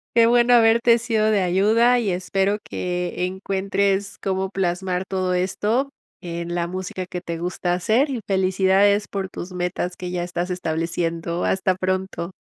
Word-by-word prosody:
qué 230 -1 +6
bueno 240 +1 +5
haberte 230 +1 +5
sido 220 -2 +1
de 200 -3 +2
ayuda, 220 +7 +3
y 215 -4 -1
espero 195 +3 0
que, 180 0 -2
encuentres 195 +1 -1
cómo 190 0 -1
plasmar 185 -1 -1
todo 185 -1 -1
esto, 215 +9 0 0.3
en 170 0 -5
la 170 - 0
música 185 +1 -5
que 180 0 -6
te 170 -2 -5
gusta 175 +1 -2
hacer. 225 +11 +2
Y 245 -4 -3
felicidades 195 +2 +3
por 195 -1 -4
tus 180 0 -7
metas 180 0 -2
que 180 -1 -6
ya 175 -1 -2
estás 175 +1 -3
estableciendo. 170 0 -2
Hasta 190 -1 +1
pronto. 185 -1 -2
190 Hz, 155 wpm, -22 LUFS, 180-205 Hz, 0.3 s, qué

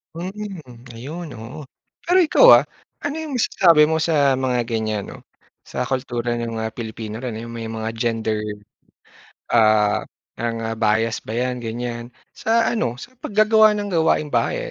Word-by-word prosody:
Mm. 175 - -8
Ayun, 155 +9 -7
oo. 115 +7 -9 0.5
Pero 355 +2 +3
ikaw, 345 +9 +5 0.2
ah, - - -17 0.4
ano 290 +1 -2
'yong 315 -3 -5
masasabi 170 -9 +4
mo 160 - +1
sa 145 -5 +2
mga 125 -2 0
ganyan 110 -3 -2
'no. - - -10 0.5
Sa - - -3
kultura 120 -2 -2
ng 115 -1 -4
mga 110 0 -3
Pilipino 110 -1 -6
na 125 -2 -4
'yong 115 +1 -7
may 115 -1 -6
mga 110 0 -4
gender, 115 -2 -1 1.1
ah, 110 -2 +3 0.3
mga 115 -1 -3
bias 110 +1 +1
ba 110 - -5
'yan 125 +2 -1
ganyan? 120 0 -4 0.3
Sa 225 +1 +2
ano 125 - -1
sa 255 +1 -12
paggagawa 215 -1 +4
ng 205 -1 -3
gawaing-bahay, 160 - +1
120 Hz, 145 wpm, -21 LUFS, 115-170 Hz, 1.1 s, ikaw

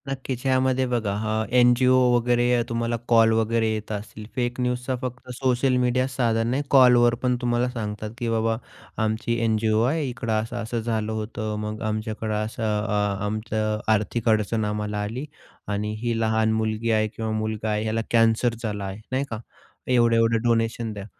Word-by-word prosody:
नक्कीच, 130 -1 -4
यामध्ये 130 0 +2
बघा 110 -5 0
हां, 110 +1 -1
एन-जी-ओ 125 +1 +5 0.2
वगैरे 120 0 +2 0.2
तुम्हाला 115 0 -1
कॉल 115 -1 +5
वगैरे 115 0 +1
येत 110 0 -5
असतील. 105 +1 -6
फेक 120 0 -2
न्यूजचा 125 +1 -1
फक्त 125 -1 -6
सोशल 130 0 +2
मीडिया 125 +1 +1
साधन 115 -4 0
नाही 135 +4 0
कॉलवर 125 -3 +6
पण 125 -1 +2
तुम्हाला 120 0 +1
सांगतात, 105 -3 -5
की 120 -2 -2
बाबा 115 0 +1 0.5
आमची 110 +2 -1
एन-जी-ओ 110 -1 +2
आहे. 150 +5 +1
इकडं 120 -2 -4
असं-असं 115 +1 -4
झालं 110 -1 -2
होतं. 110 0 -4
मग 105 0 -5
आमच्याकडं 110 0 -3
असं 110 +1 -6 0.2
अ, 105 -1 0
आमचं 110 0 -2
आर्थिक 110 +2 0
अडचण 110 0 +1
आम्हाला 105 0 -2
आली 115 +7 -4 0.4
आणि 105 +1 -2
ही 120 -1 -1
लहान 110 0 +2
मुलगी 110 +1 -1
आहे 110 -1 +2
किंवा 110 +1 -4
मुलगा 110 0 -2
आहे, 105 +1 -1
याला 110 +1 0
कॅन्सर 115 +1 +3
झाला 105 -3 -3
आहे, 95 +1 -6
नाही 130 +2 +1
का. 110 - -4 0.5
एवढे-एवढे 115 -2 +3
डोनेशन 115 0 0
द्या. 100 -1 -7
115 Hz, 160 wpm, -24 LUFS, 110-120 Hz, 0.5 s, कॉलवर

